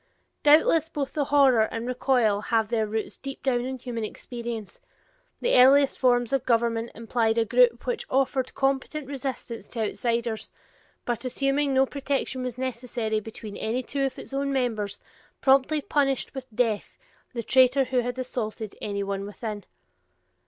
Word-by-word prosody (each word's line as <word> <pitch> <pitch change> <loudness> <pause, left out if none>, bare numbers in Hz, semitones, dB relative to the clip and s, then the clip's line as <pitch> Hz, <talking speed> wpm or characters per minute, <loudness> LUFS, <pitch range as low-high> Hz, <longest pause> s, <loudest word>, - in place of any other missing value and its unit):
Doubtless 315 +2 +5
both 285 -4 -3
the 290 -2 0
horror 270 -5 +5
and 230 +1 -4
recoil 245 -4 +2
have 220 -1 +1
their 220 -2 0
roots 220 +1 -3
deep 275 0 -8
down 250 -3 +2
in 260 0 -4
human 240 -2 -5
experience; 235 - -6 0.6
the - - +1
earliest 270 +2 +6
forms 245 -1 +2
of 270 - +2
government 230 -1 +1
implied 225 0 0
a 230 - +3
group - - +3
which 485 -2 -2
offered 265 -1 0
competent 275 +2 -1
resistance 260 -5 -5
to 230 - -4
outsiders, 235 -2 -2 0.6
but 240 0 -2
assuming 275 +2 0
no 265 +1 +5
protection 275 -1 -2
was 250 -1 -4
necessary 240 -3 -2
between 215 -1 -9
any 240 +4 -2
two 275 +2 -2
of 270 - -2
its - - -10
own 275 0 -1
members, 225 -7 -1 0.4
promptly 275 +3 +3
punished 275 -2 0
with 265 -2 -7
death 220 -2 -1 0.4
the 235 -1 -3
traitor 260 +3 +5
who 255 0 0
had 245 +1 -2
assaulted 225 -4 -4
anyone 200 -1 -2
within. 205 0 -6
250 Hz, 150 wpm, -26 LUFS, 225-270 Hz, 0.6 s, earliest